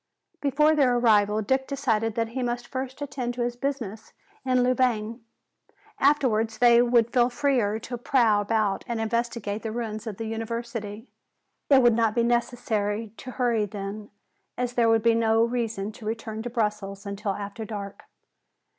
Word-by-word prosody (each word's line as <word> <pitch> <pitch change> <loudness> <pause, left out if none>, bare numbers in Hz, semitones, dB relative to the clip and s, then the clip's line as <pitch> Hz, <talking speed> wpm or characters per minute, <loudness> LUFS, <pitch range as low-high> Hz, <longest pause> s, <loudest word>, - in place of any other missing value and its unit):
Before 300 +2 +3
their 260 -5 +3
arrival 215 -2 +3
Dick 265 +5 0
decided 225 -6 0
that 230 -1 -1
he 255 +3 -4
must 240 0 -2
first 265 +1 -5
attend 250 -3 -4
to 245 - -1
his 240 0 -2
business 240 -5 -4 0.3
in 255 -1 +2
Louvain. 240 -2 0 0.8
Afterwards 235 -6 +2
they 240 0 +6
would 235 -1 +3
feel 245 -1 +4
freer 240 -5 +1
to 245 -1 -6
prowl 230 -5 +3
about 210 -1 0
and 235 -2 -2
investigate 225 -2 -2
the 220 - -4
ruins 220 -1 -4
of 210 -3 -5
the 225 - -4
University. 225 0 -5 0.6
It 270 -2 +6
would 240 -1 +6
not 225 -1 +1
be 235 - +3
necessary 230 -3 -1
to 255 - -9
hurry 240 -4 0
then, 205 +1 -6 0.5
as 245 0 -2
there 235 -2 +3
would 225 -1 +3
be 230 0 +5
no 225 0 +3
reason 230 -4 -2
to 215 - -12
return 220 -1 -4
to 245 - -4
Brussels 210 -4 -2
until 200 0 -3
after 205 +2 -6
dark. 205 -2 -7
230 Hz, 165 wpm, -26 LUFS, 215-245 Hz, 0.8 s, they